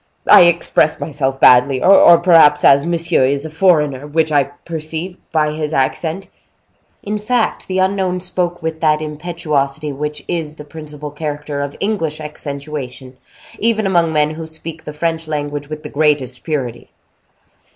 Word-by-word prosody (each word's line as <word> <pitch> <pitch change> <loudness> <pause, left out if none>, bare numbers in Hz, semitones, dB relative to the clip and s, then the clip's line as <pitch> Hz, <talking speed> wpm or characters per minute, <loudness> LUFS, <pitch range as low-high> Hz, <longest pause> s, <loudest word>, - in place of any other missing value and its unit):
I - - +8
express 170 -2 +2
myself 135 -3 -3
badly, 130 +1 +5
or 185 -3 +7
perhaps, 165 -4 +5
as 140 +3 +5
monsieur 170 -3 +1
is 140 +3 0
a 160 - -7
foreigner, 150 -6 +1
which 160 +1 0
I 145 -2 +3
perceive 160 +4 -7 0.2
by 155 -2 +1
his 155 0 -4
accent—" 160 +7 -1 0.8
In 210 +1 -3
fact, 230 +2 -1
the 185 - -2
unknown 190 -1 0
spoke 175 -1 -3
with 160 0 -4
that 155 -1 +2
impetuosity 150 -2 -3
which 150 +2 -5
is 160 -3 -3
the 150 - -10
principal 150 -1 -9
character 150 -1 -5
of 140 0 -5
English 165 -8 -2
accentuation, 140 -4 -7 0.4
even 220 -1 +1
among 170 -4 +2
men 150 -1 +1
who 160 +1 -7
speak 160 0 -9
the - - -6
French 165 +1 -2
language 145 -1 -4
with 155 0 -7
the - - -6
greatest 145 -4 0
purity. 130 -7 -4
155 Hz, 150 wpm, -17 LUFS, 145-170 Hz, 0.8 s, I